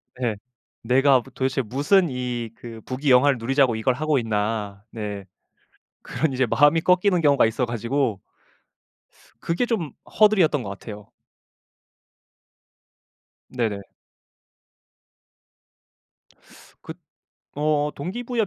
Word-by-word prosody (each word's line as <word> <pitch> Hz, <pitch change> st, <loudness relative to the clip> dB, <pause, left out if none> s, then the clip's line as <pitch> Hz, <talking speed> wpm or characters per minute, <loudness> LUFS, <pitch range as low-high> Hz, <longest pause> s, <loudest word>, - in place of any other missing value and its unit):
네. 120 Hz, -4 st, -2 dB, 0.5 s
'내가 130 Hz, +2 st, +4 dB
도 135 Hz, +2 st, -16 dB
도대체 130 Hz, +1 st, -1 dB
무슨 145 Hz, -, +2 dB
이 125 Hz, -3 st, -4 dB
그 115 Hz, -1 st, -10 dB
부귀영화를 130 Hz, 0 st, +3 dB
누리자고 130 Hz, +1 st, +1 dB
이걸 110 Hz, +3 st, +1 dB
하고 150 Hz, +2 st, 0 dB
있나.' 105 Hz, -2 st, -3 dB
네. 105 Hz, -3 st, -6 dB, 0.8 s
그런 160 Hz, -3 st, -2 dB
이제 130 Hz, 0 st, +1 dB
마음이 145 Hz, +7 st, +3 dB
꺾이는 180 Hz, +1 st, +3 dB
경우가 140 Hz, -5 st, +4 dB
있어가지고 120 Hz, -1 st, -1 dB, 1.2 s
그게 170 Hz, +9 st, -1 dB
좀 205 Hz, -11 st, -2 dB, 0.3 s
허들이었던 185 Hz, -, +4 dB
것 100 Hz, -, -6 dB
같아요. 105 Hz, +1 st, -9 dB, 2.4 s
네네. 110 Hz, -5 st, -2 dB, 3.0 s
그 -, -, -8 dB, 0.6 s
어 150 Hz, 0 st, +1 dB
동기부여 230 Hz, -, -3 dB
130 Hz, 210 characters per minute, -23 LUFS, 115-150 Hz, 3.0 s, 내가